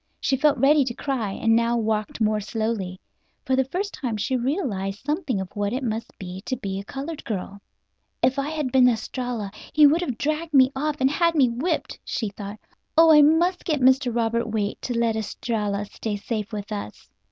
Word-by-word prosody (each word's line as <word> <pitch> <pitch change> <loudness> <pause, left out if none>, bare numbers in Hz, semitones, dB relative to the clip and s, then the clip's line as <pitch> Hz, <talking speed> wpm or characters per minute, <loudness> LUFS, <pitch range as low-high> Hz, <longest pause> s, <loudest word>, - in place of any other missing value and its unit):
She 270 - +1
felt 290 +2 +3
ready 290 +1 +5
to 240 -2 -4
cry, 240 -8 -2
and 225 +2 +2
now 235 +1 +2
walked 215 -1 -1
more 215 -1 +2
slowly. 210 -3 -3 0.5
For 260 - +2
the 265 0 +2
first 385 +9 -3
time 235 -5 -3
she 260 +6 -1
realized 240 - -2
something 295 - -1
of 190 -1 -6
what 205 +1 -1
it 260 +2 -2
must 225 -1 -4
be 185 0 -7
to 255 - -1
be 195 -4 -4
a - - -6
colored 280 +8 -6
girl. 200 -1 -5 0.6
"If 260 +2 +3
I 275 +2 -1
had 305 -5 -2
been 255 -1 +6
Estralla 235 -2 -3 0.2
he 300 -1 +7
could 320 +4 +3
have 260 -10 -3
dragged 310 +2 -2
me 260 -1 +6
off 300 +2 -2
and 265 +1 +4
had 335 +2 +2
me 265 -5 +4
whipped," 255 +10 -2
she 220 - -2
thought. 205 +1 -8 0.4
"Oh, 325 0 +8
I 300 -1 +8
must 340 +5 +3
get 305 -4 0
Mr. 260 0 +4
Robert 235 0 0
Waite 210 -2 -2
to 245 -2 -3
let 230 -1 +1
Estralla 210 -2 -2
stay 210 +1 -4
safe 210 0 -4
with 205 -1 -6
us." 205 - -6
240 Hz, 200 wpm, -24 LUFS, 210-280 Hz, 0.6 s, Oh